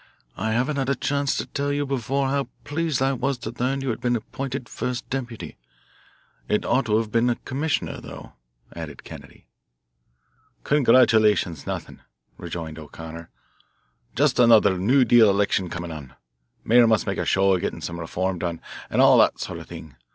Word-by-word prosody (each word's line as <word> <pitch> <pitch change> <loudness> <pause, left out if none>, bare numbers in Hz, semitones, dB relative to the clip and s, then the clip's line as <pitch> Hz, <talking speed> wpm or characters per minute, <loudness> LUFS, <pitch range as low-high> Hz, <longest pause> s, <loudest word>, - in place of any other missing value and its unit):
I 110 0 -2
haven't 130 +6 0
had 135 -1 -1
a 140 - +2
chance 140 +2 -1
to - - -2
tell 140 0 -2
you 145 0 -1
before 135 +1 -1
how 140 0 -1 0.2
pleased 155 -3 -1
I 135 +1 +2
was 135 +1 -1
to 115 -2 -6
learn 135 +2 0
you 135 -2 -1
had 110 - -6
been 120 -1 +1
appointed 130 +2 -5
first 125 +2 -4
deputy. 125 -4 -5 0.9
It 105 - 0
ought 130 -2 +1
to 105 0 +3
have 110 -1 -2
been 120 +1 +2
commissioner, 145 +4 -2
though," - - -11 0.4
added 80 -5 -8
Kennedy. - - -12 1.2
"Congratulations 110 - +3
nothing," - - -5 0.4
rejoined 80 -2 -6
O'Connor. 80 +2 -10 0.9
"Just 140 -1 +2
another 110 -5 +6
new 125 +9 +3
deal 120 -4 +6
election 100 -2 +1
coming 85 0 -5
on, 70 -5 -9 0.5
mayor 120 +1 +5
must 110 -2 +2
make - - -2
a - - 0
show 95 0 +3
of 90 - 0
getting - - -3
some 85 0 -5
reform 90 +2 -2
done, 85 -1 -3 0.3
and - - +3
all - - +7
that - - +3
sort - - -5
of - - -11
thing. 70 -4 -11
115 Hz, 170 wpm, -24 LUFS, 95-135 Hz, 1.2 s, all